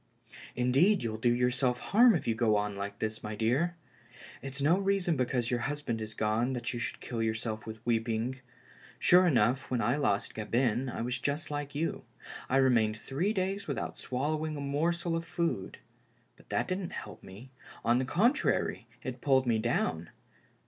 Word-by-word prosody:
"Indeed, 135 +11 +3
you'll 110 -1 -2
do 120 +1 +3
yourself 125 +1 +1
harm 230 +3 +5
if - - -3
you 115 - +3
goon 105 -3 +1
like 100 0 -5
this, 110 0 -3
my 105 0 -5
dear. 130 +11 +1 0.7
It's 135 0 -6
no 160 +7 +3
reason 195 -4 +1
because 125 -2 0
your 120 - +1
husband 135 -4 -3
is 110 0 -6
gone 110 +4 +1
that 120 0 -3
you 120 - -3
should 115 - -4
kill 115 -2 -4
yourself 110 0 -2
with 110 +1 -8
weeping. 115 +2 0 0.6
Sure 180 +1 +5
enough, 125 -3 +2
when 125 - 0
I 120 +3 +1
lost 105 -9 0
Gabin 120 +3 0
I 120 - -4
was 125 +2 -2
just 145 +3 -2
like 145 -1 -4
you. 160 +3 -2 0.5
I 130 - +3
remained 115 -5 +3
three 150 - -1
>days 195 0 -2
without 140 - -4
swallowing 155 +4 -2
a - - -5
morsel 165 +5 0
of 165 - -2
food. 165 - -2 0.6
But - - -22
that - - 0
didn't 185 -1 -3
help 105 -4 -7
me 105 +8 -12 0.2
— - - -17
on 120 +2 +4
the 130 - 0
contrary, 220 - +1 0.2
it - - -5
pulled 135 -2 +3
me 115 -2 +2
down. 85 -8 -1
125 Hz, 175 wpm, -30 LUFS, 115-150 Hz, 0.7 s, harm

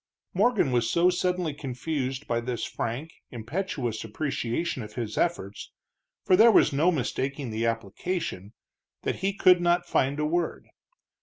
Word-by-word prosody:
Morgan 205 - +2
was 120 -2 +1
so 175 +2 +4
suddenly 180 -3 0
confused 135 0 -3
by 120 -1 0
this 120 0 -3
frank, 130 +8 -4 0.2
impetuous 120 - -3
appreciation 130 +4 -2
of 105 -1 -9
his 115 -3 -4
efforts, 105 - -2 0.5
for 185 - +4
there 220 +5 +7
was 180 -8 +5
no 160 +6 +3
mistaking 135 -2 -2
the 110 +1 0
application, 115 - -3 0.5
that - - -1
he 195 +2 0
could 185 -2 +5
not 175 0 +2
find 140 +3 +1
a 150 - +1
word. 170 +3 -2
140 Hz, 145 wpm, -27 LUFS, 120-175 Hz, 0.5 s, there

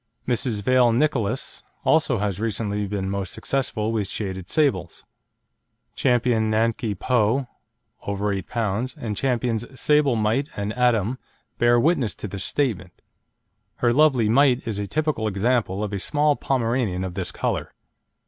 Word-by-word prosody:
Mrs. 120 -4 -1
Vale 125 0 +4
Nicolas 125 -3 0 0.2
also 155 -6 +3
has 100 -2 -2
recently 105 -2 -2
been 95 -1 -3
most 100 -1 -3
successful 120 -5 -1
with 105 -4 -1
shaded 95 -3 -5
sables. 95 - 0 0.9
Ch. - - -8
Nanky 115 -3 +1
Po, 125 +4 +1 0.6
over 100 0 -2
8 95 - -5
lb., 115 +2 -2
and 105 -3 -4
Champions 120 0 -1
Sable 150 -4 +3
Mite 115 +7 0
and 100 +1 -2
Atom 120 -1 +1 0.4
bear 120 0 +4
witness 135 -5 +1
to - - -6
this 100 0 -5
statement. 100 -11 -2 0.8
Her 120 -1 +2
lovely 135 -5 +4
Mite 130 +2 +3
is 105 -3 -3
a 100 - -3
typical 150 -4 -1
example 105 -1 0
of 105 -1 -4
a 100 - -2
small 150 +7 +2
Pomeranian 115 -9 -1
of 95 -1 -4
this - - -4
colour. - - -2
115 Hz, 140 wpm, -23 LUFS, 100-130 Hz, 0.9 s, Vale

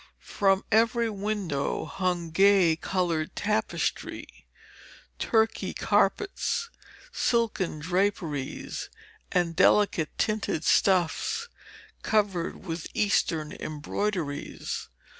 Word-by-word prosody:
From 195 -2 +3
every 230 +1 +3
window 200 -8 -2
hung 180 -3 -2
gay 190 -2 +5
coloured 170 -3 -1
tapestry, 215 +1 -2 0.7
Turkey 225 -1 +1
carpets, 460 +3 +1 0.4
silken 225 - 0
draperies, 165 -4 -2 0.4
and 175 -2 +1
delicate 180 -4 +4
tinted 215 -7 0
stuffs 200 - +2 0.5
covered 195 -4 0
with 165 -2 -4
Eastern 165 -7 +1
embroideries. 155 0 -4
190 Hz, 75 wpm, -27 LUFS, 165-215 Hz, 0.7 s, gay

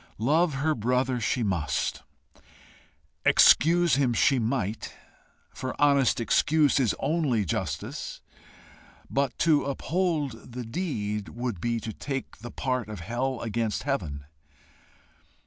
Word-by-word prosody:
Love 150 +7 +2
her 155 +4 +1
brother 125 +1 0
she 120 +2 0
must; 85 -9 -1 1.2
excuse 170 -2 +5
him 130 -4 +2
she 135 +3 +3
might, 110 -3 -2 0.6
for 130 - -6
honest 140 -4 +4
excuse 150 +5 +3
is 120 -6 +2
only 145 -10 0
justice; 80 - -4 0.9
but 140 -2 0
to 155 -3 +3
uphold 145 - -2
the 125 0 -5
deed 105 - -3
would 120 -7 -4
be 115 +1 0
to 110 0 -6
take 135 +5 -5
the 120 +3 -9
part 125 -4 -2
of 105 -5 -7
hell 125 +6 -2
against 115 -1 -2
heaven. 80 - -3
125 Hz, 115 wpm, -27 LUFS, 110-145 Hz, 1.2 s, excuse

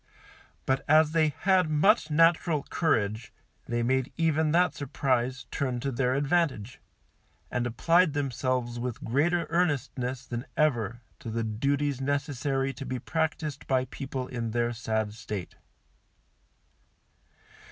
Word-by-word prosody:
But 130 0 +1
as 155 0 +5
they 160 -1 +3
had 185 +2 +2
much 155 +4 +3
natural 165 -1 +3
courage 115 - 0 0.4
they 120 0 -1
made 130 +2 +1
even 160 -2 +2
that 175 -1 +3
surprise 130 -3 -1
turn 130 -3 -1
to 140 - -1
their 125 +1 +1
advantage, 140 -6 0 0.7
and 120 0 0
applied 165 +7 +3
themselves 130 -3 -1
with 125 -1 -4
greater 165 +8 +1
earnestness 135 -6 -1
than 120 +3 -5
ever 120 -6 +1 0.2
to 115 - -7
the 115 +1 -2
duties 140 +5 -1
necessary 135 -1 -1
to - - -7
be 130 0 -2
practised 155 +1 -2
by 130 -1 +2
people 130 0 -5
in 120 -3 -3
their 120 +1 0
sad 110 -2 -2
state. 105 -4 -6
135 Hz, 125 wpm, -28 LUFS, 120-155 Hz, 0.7 s, as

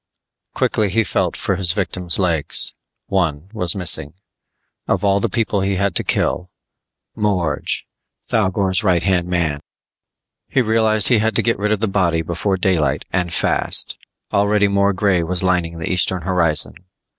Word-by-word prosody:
Quickly 105 -2 0
he 115 +5 +1
felt 100 - -1
for 95 - -1
his 90 -3 +2
victim's 90 -3 0
legs; 85 -6 +1 0.3
one 90 -2 -2
was 90 -5 +2
missing. 80 -5 0 0.7
Of - - 0
all 100 0 +3
the - - -1
people 110 -4 -1
he 95 0 0
had 100 +1 0
to - - -1
kill 90 +2 -1 0.7
Morge! 90 -8 -1 0.4
Thougor's 95 -2 +1
right 90 -4 +2
hand 90 -2 +1
man. 85 -5 -1 0.9
He 130 - +2
realized 110 -2 +2
he 120 -4 +4
had 110 +1 0
to - - +2
get 115 -2 0
rid 105 +1 0
of 110 -1 0
the 110 - +1
body 85 -5 0
before 85 +4 -2
daylight 90 -5 0
and 90 -2 -1
fast! - - 0 0.3
Already 100 0 +3
more 100 0 +2
grey 95 -2 +1
was 90 +2 +1
lining 90 -2 0
the 80 - -4
eastern 90 -1 +2
horizon. 85 -4 +1
95 Hz, 155 wpm, -19 LUFS, 85-100 Hz, 0.9 s, he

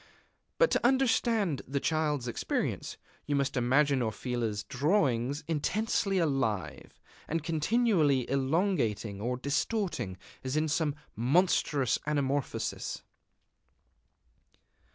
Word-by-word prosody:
But - - +4
to - - +1
understand 230 - +2
the 140 +2 -1
Child's 150 -4 0
experience, 120 - -2 0.3
you 145 - +1
must 140 0 0
imagine 130 +2 +3
Orfila's 110 -1 -2
drawings 140 - +1
intensely 195 +5 0
alive, 130 - -1 0.3
and 165 0 -2
continually 160 - +2
elongating 130 - 0
or 125 +3 -1
distorting, 140 - -1 0.3
as 130 +3 -2
in 155 +1 +2
some 150 -2 0 0.2
monstrous 140 - +2
anamorphosis. 145 -2 -2
145 Hz, 90 wpm, -30 LUFS, 125-170 Hz, 0.3 s, But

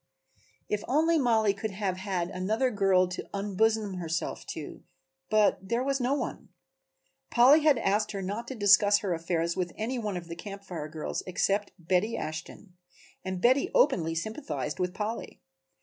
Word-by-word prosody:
If 210 -1 -2
only 320 +4 +3
Mollie 220 -6 +3
could 215 +2 -4
have 190 -2 -2
had 190 -2 -2
another 215 +7 0
girl 195 -3 +3
to 180 - -6
unbosom 205 0 0
herself 165 0 -3
to, 150 - -7 0.5
but 215 -1 +3
there 235 +6 -1
was 275 0 0
no 255 +3 +1
one; - - -5 0.8
Polly 265 +6 +6
had 300 -3 +4
asked 210 -1 +1
her 195 - -3
not 210 +5 -4
to 265 - -5
discuss 205 -1 +5
her 195 -4 -1
affairs 170 0 -1
with 180 -2 -2
any 245 +4 -2
one 210 -5 -3
of 170 -1 -7
the 170 - -6
Camp 200 +3 -8
Fire 170 -6 -6
girls 155 0 -4
except 200 +3 0
Betty 180 +5 0
Ashton, 160 +5 -7 0.5
and 185 -1 -3
Betty 260 +3 +4
openly 165 - +3
sympathized 165 - -4
with 180 +1 -1
Polly. 220 +2 -4
200 Hz, 165 wpm, -28 LUFS, 180-225 Hz, 0.8 s, Polly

